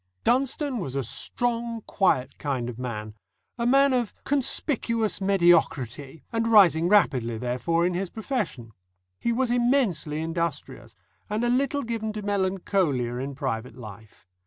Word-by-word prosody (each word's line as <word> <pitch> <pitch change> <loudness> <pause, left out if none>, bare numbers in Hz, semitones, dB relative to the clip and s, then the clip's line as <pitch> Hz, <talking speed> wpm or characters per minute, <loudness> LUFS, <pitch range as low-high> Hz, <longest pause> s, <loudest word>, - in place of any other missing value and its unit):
Dunstone 265 +1 +1
was 135 -8 -5
a 135 - 0
strong, 235 - -2
quiet 130 -10 +1
kind 130 -5 -2
of 120 0 -8
man 110 -4 -5 0.5
a 235 - +1
man 275 +1 +5
of 240 -4 -1
conspicuous 235 -6 0
mediocrity, 165 - +2
and 230 0 0
rising 180 -7 +5
rapidly, 130 - +3
therefore, 125 +8 0
in 180 - +1
his 185 +1 -2
profession. 205 - -4 0.5
He 235 - 0
was 245 +1 0
immensely 240 - +1
industrious, 165 +1 -4 0.3
and 210 +3 -1
a 240 - +2
little 275 +3 +1
given 225 -2 -3
to 210 -1 -5
melancholia 185 -10 0
in 135 +2 -4
private 125 -3 -4
life. 110 -3 -12
185 Hz, 135 wpm, -26 LUFS, -, 0.5 s, man